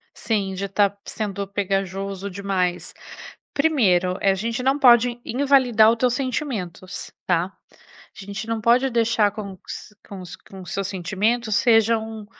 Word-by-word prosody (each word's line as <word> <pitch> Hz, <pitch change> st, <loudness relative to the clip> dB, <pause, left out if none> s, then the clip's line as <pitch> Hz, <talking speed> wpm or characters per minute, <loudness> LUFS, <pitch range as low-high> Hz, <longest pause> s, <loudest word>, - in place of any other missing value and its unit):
Sim, 200 Hz, -4 st, -1 dB
já 195 Hz, +1 st, -4 dB
tá 200 Hz, +1 st, +3 dB
p 200 Hz, -, -29 dB
sendo 200 Hz, -2 st, -4 dB
pegajoso 195 Hz, 0 st, -3 dB
demais. 185 Hz, -2 st, -2 dB, 0.6 s
Primeiro, 195 Hz, -, +2 dB
eh, 195 Hz, -, +3 dB
a -, -, 0 dB
gente 230 Hz, +5 st, -3 dB
não 270 Hz, +3 st, +2 dB
pode 240 Hz, -2 st, +5 dB
invalidar 250 Hz, -4 st, +4 dB
os 235 Hz, -, +1 dB
teus 245 Hz, 0 st, +1 dB
sentimentos, 230 Hz, -, -4 dB
tá? 175 Hz, -1 st, +2 dB, 0.3 s
A 200 Hz, -, -17 dB
gente 200 Hz, +2 st, -6 dB
não 225 Hz, -1 st, -1 dB
pode 245 Hz, +4 st, +3 dB
deixar 230 Hz, -3 st, +2 dB
com 200 Hz, -2 st, -7 dB
s 210 Hz, -, -8 dB
com 195 Hz, -2 st, -8 dB
os 180 Hz, -1 st, -9 dB
com 195 Hz, -, -13 dB
os 175 Hz, -, -8 dB
seus 195 Hz, -1 st, -2 dB
sentimentos 210 Hz, +5 st, -1 dB
sejam, 225 Hz, -2 st, +2 dB
210 Hz, 155 wpm, -23 LUFS, 195-235 Hz, 0.6 s, pode